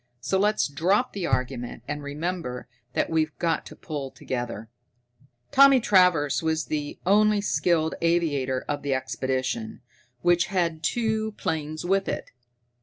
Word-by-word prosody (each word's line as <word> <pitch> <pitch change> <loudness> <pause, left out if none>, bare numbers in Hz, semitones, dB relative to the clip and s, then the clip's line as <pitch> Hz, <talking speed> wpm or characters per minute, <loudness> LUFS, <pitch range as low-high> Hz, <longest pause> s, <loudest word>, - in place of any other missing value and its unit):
So 190 +10 0
let's 210 +2 +2
drop 185 - +1
the 190 -4 -2
argument 125 -2 -2
and 145 0 -3
remember 145 -2 -4 0.3
that - - 0
we've 155 -1 0
got 165 -2 -1
to - - -11
pull 145 -4 -5
together!" 120 -4 -5 0.8
Tommy 275 -1 +7
Travers 180 - +3
was 160 -1 0
the 150 -1 -3
only 210 +2 +4
skilled 170 -5 +1
aviator 145 -7 +1
of 145 -1 -2
the 140 -2 0
expedition, 130 -3 -3 0.4
which 175 0 +3
had 175 -5 0
brought 155 - -24
two 220 0 0
planes 155 -4 -3
with 195 +2 +1
it. - - -4
160 Hz, 140 wpm, -26 LUFS, 140-185 Hz, 0.8 s, Tommy